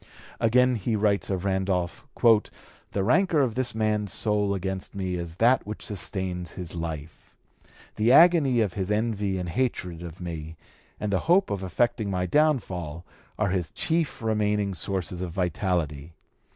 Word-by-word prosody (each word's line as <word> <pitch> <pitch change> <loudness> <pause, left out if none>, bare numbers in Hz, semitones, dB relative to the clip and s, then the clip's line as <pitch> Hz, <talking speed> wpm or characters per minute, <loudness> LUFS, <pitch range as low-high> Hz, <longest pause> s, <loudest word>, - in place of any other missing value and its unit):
Again 125 +2 +3
he 110 +2 -1
writes 105 -1 +1
of 95 -1 -2
Randolph: 95 -2 -1 0.8
"The 100 - -1
rancor 160 - +3
of 120 -4 0
this 125 -2 -1
man's 105 -2 0
soul 105 -2 +1
against 95 +1 -4
me 95 -2 -2
is 85 -2 -5
that 120 +7 +4
which 105 - -6
sustains 95 -3 -3
his 90 -3 -7
life: 80 -2 -7 0.6
the 110 +3 +3
agony 145 -5 +6
of 100 -5 0
[his] 95 -1 -3
envy 105 -3 0
and 90 -1 -3
hatred 90 -7 -2
of 85 -1 -8
me, 80 -3 -6 0.4
and 105 -1 -2
the 95 - +3
hope 190 +3 +4
of 100 - -2
effecting 105 +3 0
my 90 -1 -1
downfall, 90 - 0 0.3
are 105 -2 +1
[his] 90 -4 -1
chief 160 - -1
remaining 105 -2 +1
sources 90 -1 -3
of 90 -3 -4
vitality. 85 -4 -1
100 Hz, 150 wpm, -26 LUFS, 90-110 Hz, 0.8 s, agony